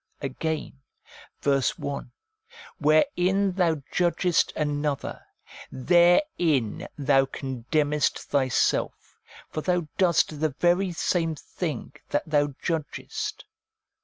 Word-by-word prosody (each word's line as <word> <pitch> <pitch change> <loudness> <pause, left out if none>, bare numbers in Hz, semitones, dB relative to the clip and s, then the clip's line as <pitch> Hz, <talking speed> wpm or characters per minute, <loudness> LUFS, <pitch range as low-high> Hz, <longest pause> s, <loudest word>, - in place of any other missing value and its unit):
Again 150 +1 -4 0.6
(verse 140 -3 +1
1), 140 -3 -5 0.3
' 470 +1 -18
Wherein 180 +6 +3
thou 170 -6 +1
judges 175 -1 +2
t - - -11
another, 145 -1 -2 0.5
therein 170 - +2
thou 135 -1 +3
condemnest 145 +3 -1
thyself; 130 -3 0 0.3
for 155 - -3
thou 180 -1 0
doest 165 -4 +2
the 155 -3 0
very 180 +2 +3
same 165 -1 0
thing 160 +1 -5 0.2
that 145 - 0
thou 145 -2 +1
judgest.' 160 -4 -4
155 Hz, 100 wpm, -26 LUFS, 140-175 Hz, 0.6 s, Wherein